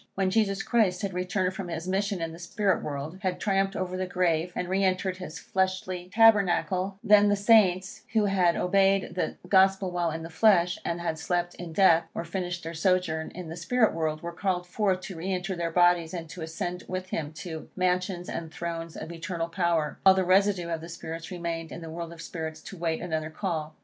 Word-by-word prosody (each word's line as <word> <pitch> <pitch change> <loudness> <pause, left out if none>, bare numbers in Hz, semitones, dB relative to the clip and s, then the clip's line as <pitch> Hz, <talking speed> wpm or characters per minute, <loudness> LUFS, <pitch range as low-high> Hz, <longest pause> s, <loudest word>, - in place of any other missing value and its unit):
When 190 -1 +1
Jesus 200 -2 +1
Christ 205 -6 +2
had 195 -2 -2
returned 185 +1 -1
from 190 -1 -5
his 165 0 -5
mission 195 -1 -1
in 165 - -3
the 165 - -10
spirit 195 +3 0
world, 150 +5 -5
had 185 -3 -1
triumphed 195 -1 +1
over 185 0 -3
the 185 0 -2
grave, 180 -1 +1
and 180 - -2
re 190 +2 +1
entered 185 0 0
his 180 -3 -7
fleshly 185 -1 -2
tabernacle, 195 -3 +3
then 210 -1 +6
the 205 - +4
Saints 200 -3 +3
who 220 -2 +3
had 185 -4 +3
obeyed 195 0 +2
the 180 - -2
Gospel 190 0 +4
while 175 -1 0
in 160 +1 -5
the 165 - -8
flesh, 180 -2 +4
and 170 0 -2
had 160 -2 -2
slept 175 +1 -1
in 175 -2 -8
death, 170 -1 +5
or 170 - -3
finished 175 0 -4
their 165 +1 -5
sojourn 165 -2 +1
in 180 -1 -6
the 165 - -6
spirit 220 +7 +2
world, 155 -1 -2
were 170 - -4
called 180 0 -1
forth 185 0 0
to 190 - -7
re 180 +4 -3
enter 185 +1 -2
their 170 -1 -2
bodies, 175 0 +3
and 165 -2 -5
to 180 - -8
ascend 175 +3 -4
with 185 0 -4
him 150 -2 -2
to 160 -1 -7
mansions 180 -1 0
and 165 -1 -5
thrones 165 0 -5
of 160 - -6
eternal 170 0 -4
power, 165 -3 0
while 190 0 +7
the 190 - +2
residue 190 -1 +3
of 165 -1 -2
the 165 - -9
spirits 165 0 -7
remained 170 -2 -4
in 170 - -7
the 165 -1 -7
world 170 0 -5
of 165 -1 -9
spirits 160 -2 -6
to - - -9
await 165 -2 -2
another 160 -3 -2
call. 160 -3 -3
180 Hz, 210 wpm, -27 LUFS, 165-190 Hz, -, while